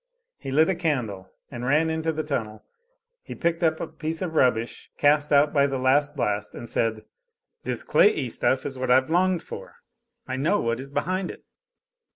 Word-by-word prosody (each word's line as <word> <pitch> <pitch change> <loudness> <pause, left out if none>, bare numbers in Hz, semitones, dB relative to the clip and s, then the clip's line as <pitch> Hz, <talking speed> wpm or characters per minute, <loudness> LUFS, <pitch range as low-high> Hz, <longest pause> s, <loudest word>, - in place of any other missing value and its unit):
He - - -7
lit 155 +4 +4
a 190 - +2
candle 120 - -2 0.2
and 120 -2 -6
ran 150 +5 +2
into 160 0 -1
the 155 0 -3
tunnel; 115 -8 -4 0.6
he - - -9
picked 170 -1 -1
up 160 -2 +2
a - - -2
piece 160 +1 -5
of 170 -3 -4
rubbish 120 -6 +1
cast 145 0 +3
out 145 +1 +4
by 140 -2 +4
the 135 -1 -2
last 145 +3 +2
blast, 105 -6 -2
and 120 - -8
said: 110 -2 -1 0.6
"This - - -2
clayey 435 -3 +3
stuff 130 - 0
is 135 -2 -4
what 130 0 -2
I've 130 +4 +4
longed 180 0 +2
for - - -9 0.5
I 130 0 -3
know 165 +10 +1
what 115 +1 -1
is 135 +1 -7
behind 180 +7 -2
it." - - -10
145 Hz, 190 wpm, -25 LUFS, 130-160 Hz, 0.6 s, lit